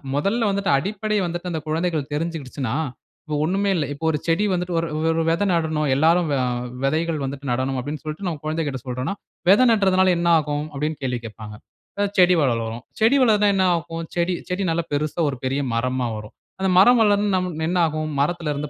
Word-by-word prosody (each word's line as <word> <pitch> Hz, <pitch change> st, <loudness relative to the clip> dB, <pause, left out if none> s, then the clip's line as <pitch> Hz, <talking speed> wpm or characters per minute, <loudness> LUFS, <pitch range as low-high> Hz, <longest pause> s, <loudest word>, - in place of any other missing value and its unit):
மொதல்ல 205 Hz, +10 st, +1 dB
வந்துட்டு 195 Hz, -4 st, 0 dB
அடிப்படை 210 Hz, +7 st, -2 dB
வந்துட்டு, 175 Hz, +1 st, -4 dB
அந்த 160 Hz, -, -2 dB
குழந்தைகள் 160 Hz, -2 st, -1 dB
தெரிஞ்சுகிடுச்சுன்னா 145 Hz, -6 st, -3 dB, 0.5 s
இப்போ 155 Hz, -2 st, -3 dB
ஒண்ணுமே 195 Hz, +5 st, 0 dB
இல்ல. 160 Hz, -5 st, 0 dB
இப்போ 145 Hz, +3 st, -6 dB
ஒரு 155 Hz, -, +1 dB
செடி 170 Hz, +5 st, +2 dB
வந்துட்டு 180 Hz, 0 st, -2 dB
ஒரு 165 Hz, 0 st, 0 dB, 0.2 s
ஒரு 165 Hz, 0 st, +1 dB
வெத 170 Hz, +4 st, +1 dB
நடணும். 160 Hz, -3 st, 0 dB
எல்லோரும் 165 Hz, +5 st, +3 dB
வ -, -, +2 dB, 0.5 s
வெதைகள் 155 Hz, +3 st, 0 dB
வந்துட்டு 135 Hz, +1 st, -5 dB
நடணும் 130 Hz, +2 st, -1 dB
அப்படின்னு 145 Hz, +4 st, -5 dB
சொல்லிட்டு, 155 Hz, +5 st, -6 dB
நம்ம 160 Hz, -4 st, -3 dB
கொழந்தைகள்ட 155 Hz, -4 st, -2 dB
சொல்றோன்னா, 125 Hz, +7 st, -3 dB, 0.4 s
"வெதை 205 Hz, +7 st, +6 dB
நட்டுறதனால 190 Hz, -4 st, +4 dB
என்ன 170 Hz, 0 st, 0 dB
ஆகும்?" 150 Hz, -1 st, -2 dB
அப்படின்னு 150 Hz, +2 st, -2 dB
கேள்வி 125 Hz, -2 st, -1 dB
கேட்ப்பாங்க. 105 Hz, -1 st, -9 dB, 0.4 s
"அ 205 Hz, -, +2 dB
செடி 180 Hz, -1 st, +6 dB
வளரும்" 115 Hz, -3 st, -1 dB, 0.2 s
"செடி 230 Hz, +6 st, +5 dB
வளர்ந்தா 210 Hz, -4 st, +4 dB
என்ன 190 Hz, -, +2 dB
ஆகும்?" 165 Hz, 0 st, -4 dB
"செடி 175 Hz, +1 st, +1 dB, 0.2 s
செடி 185 Hz, +2 st, -1 dB
நல்லா 165 Hz, +1 st, 0 dB
பெரிசா 150 Hz, +3 st, -2 dB
ஒரு 135 Hz, -, -5 dB
பெரிய 135 Hz, +2 st, 0 dB
மரமா 125 Hz, +1 st, 0 dB
வரும்." 105 Hz, 0 st, -10 dB, 0.3 s
"அந்த 190 Hz, -, +2 dB
மரம் 245 Hz, +5 st, +6 dB
வளர்ந்து 205 Hz, -1 st, +2 dB
நம் 185 Hz, 0 st, 0 dB, 0.2 s
என்ன 180 Hz, -, 0 dB
ஆகும்?" 155 Hz, 0 st, -3 dB
"மரத்தில 160 Hz, 0 st, -1 dB
இருந்து 145 Hz, +1 st, -4 dB
160 Hz, 185 wpm, -22 LUFS, 145-185 Hz, 0.5 s, வெதை